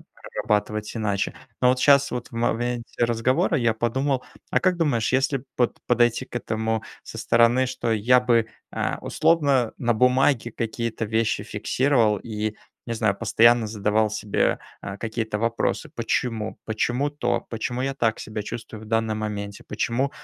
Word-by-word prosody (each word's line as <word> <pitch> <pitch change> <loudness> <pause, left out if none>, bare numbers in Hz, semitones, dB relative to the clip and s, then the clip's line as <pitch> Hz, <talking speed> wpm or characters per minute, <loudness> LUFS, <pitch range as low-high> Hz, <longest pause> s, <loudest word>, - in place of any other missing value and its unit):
э, - - -19 0.4
прорабатывать 105 +1 -1
иначе. 100 -3 -1 0.3
Но 125 - +5
вот 130 0 +3
щас, 140 +1 +5
вот 125 - -4
в - - -30
моменте 120 0 -1
разговора, 130 +9 +1
я 115 -2 +2
подумал: 130 +4 0 0.3
а - - +2
как 185 -1 +2
думаешь, 135 -10 +1
если 135 +1 +2
б, 125 - -15
вот, 120 - +1
подойти 120 +1 +3
к - - -16
этому 110 -1 -1 0.2
со - - -9
стороны, 120 +2 +4
что 120 -2 -2
я 120 +4 +4
бы, 120 -3 +3 0.3
э, - - -1
условно, 140 -8 +2
на 120 -1 +2
бумаге 125 +1 +3
какие-то 115 0 -3
вещи 110 +1 0
фиксировал, 120 -6 +2
и, 110 0 -4 0.3
не 115 - -3
знаю, 110 -3 +1
постоянно 115 +1 +4
задавал 105 0 +1
себе, 105 -1 0 0.2
э, 100 0 -5
какие-то 110 -2 -3
вопросы 115 +7 -1
"почему?", 115 -2 -2
"Почему 120 +6 0
то?", 120 -5 -1
"Почему 120 +2 -3
я 135 0 -1
так 115 -4 0
себя 110 -1 -5
чувствую 110 +1 -7
в - - -9
данном 110 -1 0
моменте?", 100 -1 -5
"Почему, 120 +5 -1
115 Hz, 160 wpm, -24 LUFS, 110-125 Hz, 0.4 s, Но